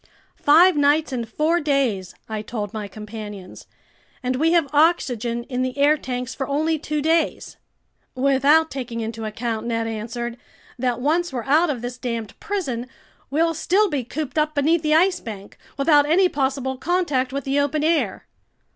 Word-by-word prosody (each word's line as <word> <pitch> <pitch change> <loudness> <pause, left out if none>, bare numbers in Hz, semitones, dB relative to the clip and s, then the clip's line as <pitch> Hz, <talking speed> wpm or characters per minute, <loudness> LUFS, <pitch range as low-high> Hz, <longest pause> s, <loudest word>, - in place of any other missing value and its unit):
"Five 335 +5 +6
nights 290 +1 +3
and 235 -3 -3
four 315 +8 +1
days!" 265 - 0
I 220 -1 -4
told 210 -2 -5
my 215 -2 -4
companions. 210 -2 -9 0.6
"And 255 0 -1
we 320 +4 +2
have 335 -4 +3
oxygen 245 -7 +2
in 250 0 -3
the 255 +1 -2
air 290 +2 +5
tanks 250 -3 -4
for 270 - -4
only 310 +3 0
two 300 0 -2
days." 325 +1 0 0.6
"Without 275 +4 +3
taking 245 -3 -5
into 225 0 -5
account," 225 +1 -3
Ned 230 -1 -1
answered, 230 +2 -4 0.4
"that 245 -1 0
once 325 +6 +1
we're 245 -3 -3
out 310 +6 +3
of 250 -5 -3
this 245 +1 -5
damned 230 -4 -4
prison, 265 - -3 0.4
we'll 330 +4 +1
still 380 +5 +2
be 280 -4 -1
cooped 295 +4 -3
up 305 0 0
beneath 310 +3 +2
the 305 -1 +2
Ice 360 +3 +3
Bank, 205 -3 -9 0.2
without 290 0 +4
any 365 +4 +5
possible 265 -3 -1
contact 295 -8 0
with 280 0 -3
the 275 +2 0
open 290 +1 0
air!" 325 0 0
275 Hz, 165 wpm, -22 LUFS, 235-310 Hz, 0.6 s, Five